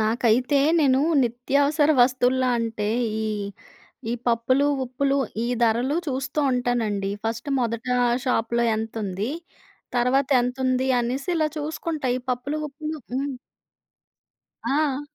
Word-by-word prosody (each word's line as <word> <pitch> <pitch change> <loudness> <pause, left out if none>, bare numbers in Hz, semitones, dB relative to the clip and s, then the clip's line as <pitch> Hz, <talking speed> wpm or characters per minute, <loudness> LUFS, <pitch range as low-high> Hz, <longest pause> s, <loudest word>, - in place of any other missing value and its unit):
నాకైతే 235 +5 +2 0.2
నేను 265 -2 +4 0.2
నిత్యావసర 280 +5 +2
వస్తువుల్లో 255 0 +2
అంటే, 225 -2 -2 0.4
ఈ - - -1 0.8
ఈ - - 0
పప్పులు, 240 +4 +2 0.2
ఉప్పులు 275 +2 0 0.3
ఈ - - -1 0.2
ధరలు 240 +6 +2
చూస్తూ 270 +2 -2
ఉంటానండి. 225 -5 0
ఫర్స్ట్ 225 +4 -3
మొదట 230 0 -2 0.4
షాప్‌లో 235 -1 +1
ఎంతుంది, 215 -1 -3 0.7
తర్వాతెంతుంది 255 0 +2
అనేసి 255 +7 -2
ఇలా 310 -1 +2
చూసుకుంటా. 305 -1 -3
ఈ - - -2
పప్పులు, 255 +5 -2
ఉప్పులు 305 +2 -6 0.2
హ్మ్. 275 +1 -2 1.3
ఆ! 285 -1 +1
255 Hz, 105 wpm, -24 LUFS, 235-280 Hz, 1.3 s, నేను